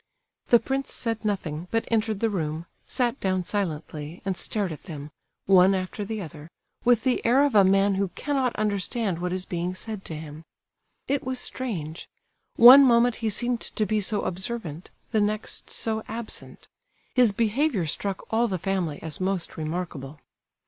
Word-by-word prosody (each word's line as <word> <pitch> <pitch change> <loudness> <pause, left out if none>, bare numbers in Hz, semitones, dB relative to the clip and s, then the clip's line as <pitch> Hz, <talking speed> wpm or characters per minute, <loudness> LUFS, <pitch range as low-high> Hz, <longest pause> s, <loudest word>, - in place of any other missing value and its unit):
The 240 - +7
prince 270 +2 -2
said 225 -2 -2
nothing, 180 -6 -2
but 225 0 -1
entered 220 -2 0
the 225 -1 +2
room, 160 -3 -3 0.2
sat 245 0 0
down 185 -2 0
silently, 160 -4 -3
and 190 -1 -1
stared 200 0 -1
at 155 - -9
them, 150 -3 -8 0.3
one 190 0 +6
after 185 +2 -3
the 215 0 -4
other, 155 -1 -10 0.3
with 240 -2 +4
the 255 -2 +1
air 255 +5 +4
of 285 - 0
a 205 -2 +7
man 195 +1 +4
who 195 +1 0
cannot 270 -4 -1
understand 205 -2 -1
what 180 0 -2
is 185 0 -3
being 175 +1 -3
said 215 0 -6
to 160 - -5
him. 155 0 -8 0.7
It 280 0 0
was 260 0 -2
strange—one 240 - +4
moment 240 -2 +4
he 225 -2 -1
seemed 240 +3 -1
to 215 - -2
be 215 0 0
so 205 +1 0
observant, 185 -3 -4 0.2
the 220 -3 +2
next 210 +1 -2
so 220 -1 -1
absent; 225 +1 -7 0.5
his 250 -4 +5
behaviour 225 - +1
struck 190 +5 -2
all 235 +2 +3
the 190 -4 -2
family 180 -4 -2
as 160 +1 -5
most 190 -2 -1
remarkable. 155 -3 -5
200 Hz, 165 wpm, -26 LUFS, 175-230 Hz, 0.7 s, The